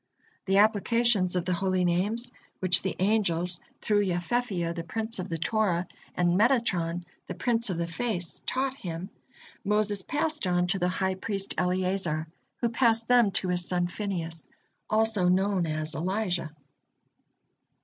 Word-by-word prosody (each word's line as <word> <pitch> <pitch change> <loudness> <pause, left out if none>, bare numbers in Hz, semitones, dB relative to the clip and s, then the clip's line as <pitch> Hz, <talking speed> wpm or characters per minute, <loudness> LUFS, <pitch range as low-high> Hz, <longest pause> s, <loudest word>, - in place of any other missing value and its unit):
The 195 0 +2
applications 215 -2 +3
of 180 -1 0
the 185 - 0
Holy 185 0 +1
Names, 210 +8 0 0.3
which 180 -1 +3
the 190 - -2
angels 180 -4 +2 0.2
through 210 -1 +2
Yefefiyah, 180 -1 -1
the 170 -1 -5
prince 220 +5 -2
of 185 - -4
the 165 - -2
Torah, 180 -1 +1 0.3
and 175 -1 +2
Metatron, 180 -5 +2 0.2
the - - -5
prince 235 -2 0
of 180 - -2
the 170 - 0
Face, 175 0 -3
taught 265 0 0
him, 180 -5 -6 0.5
Moses 210 -1 +1
passed 305 - -1
on 180 0 +2
to 180 +2 0
the 180 0 +1
high 190 +1 0
priest 195 0 -2
Eleazar, 180 -3 0 0.4
who 235 - +2
passed 230 -1 +2
them 245 -4 +5
to 185 - 0
his 180 0 0
son 175 -1 +1
Phinehas, 175 -4 -4 0.4
also 215 -4 +3
known 185 -1 +2
as 155 0 -2
Elijah. 185 -1 -1
190 Hz, 150 wpm, -28 LUFS, 175-220 Hz, 0.5 s, them